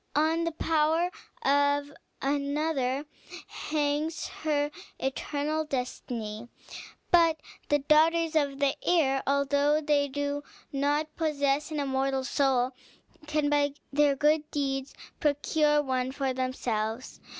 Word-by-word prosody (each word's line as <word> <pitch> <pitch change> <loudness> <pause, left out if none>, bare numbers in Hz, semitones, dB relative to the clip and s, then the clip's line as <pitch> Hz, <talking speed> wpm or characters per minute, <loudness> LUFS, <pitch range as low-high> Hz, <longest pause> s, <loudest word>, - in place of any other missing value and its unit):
On 320 +3 +2
the 335 - 0
power 320 +2 +1 0.3
of 285 -1 +2 0.3
another 280 -1 0 0.4
hangs 300 +2 -2
her 295 -2 -1 0.3
eternal 290 +3 -1
destiny. 240 -5 -4 0.6
But 330 -2 +5 0.3
the 290 - +4
daughters 320 +3 +3
of 285 -3 +1
the 280 -1 +1
air, 275 -6 +3
although 285 +2 +2
they 290 -2 +2
do 285 +1 -2 0.3
not 290 +3 0
possess 290 -2 0
an 305 -1 -3
immortal 270 -1 0
soul, 260 -2 +1 0.6
can, 300 -1 +1
by 290 -1 +2 0.2
their 290 -1 +4
good 300 +2 +2
deeds, 270 -1 -2 0.2
procure 295 0 +2
one 260 -1 -1
for 270 -1 -1
themselves. 250 -3 -3
285 Hz, 110 wpm, -28 LUFS, 270-305 Hz, 0.6 s, But